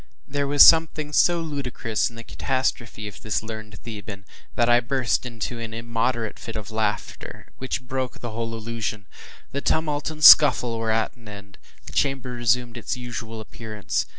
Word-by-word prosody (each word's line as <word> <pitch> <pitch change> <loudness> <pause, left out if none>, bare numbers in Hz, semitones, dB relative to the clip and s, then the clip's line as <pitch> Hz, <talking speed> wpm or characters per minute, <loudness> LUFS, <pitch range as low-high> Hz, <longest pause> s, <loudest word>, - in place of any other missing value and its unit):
There 140 0 -2
was 145 0 +8
something 160 -2 +4
so 175 +2 +4
ludicrous 130 -7 -2
in 115 - -16
the 115 - -9
catastrophe 120 -5 -3
of 105 - -10
this 110 0 -2
learned 110 -2 -8
Theban 105 -3 -8 0.3
that 120 - +2
I 120 0 +5
burst 125 0 -1
into 115 0 -5
an 115 -1 -6
immoderate 115 0 -2
fit 115 - -8
of 110 -1 -6
laughter, 110 -1 -4
which 130 0 -3
broke 130 0 -3
the 120 - -6
whole 115 +1 -4
illusion. 110 -2 -5 0.5
The 140 - -3
tumult 150 -1 0
and 155 -1 -9
the - - +6
scuffle 125 -7 +8
were 115 0 -2
at 110 +1 0
an 120 -3 -17
end. 100 -1 -11 0.3
The - - -11
chamber 135 -2 0
resumed 120 0 0
its 130 +3 -3
usual 120 -2 -6
appearance. 105 -5 -4
115 Hz, 175 wpm, -24 LUFS, 110-130 Hz, 0.5 s, was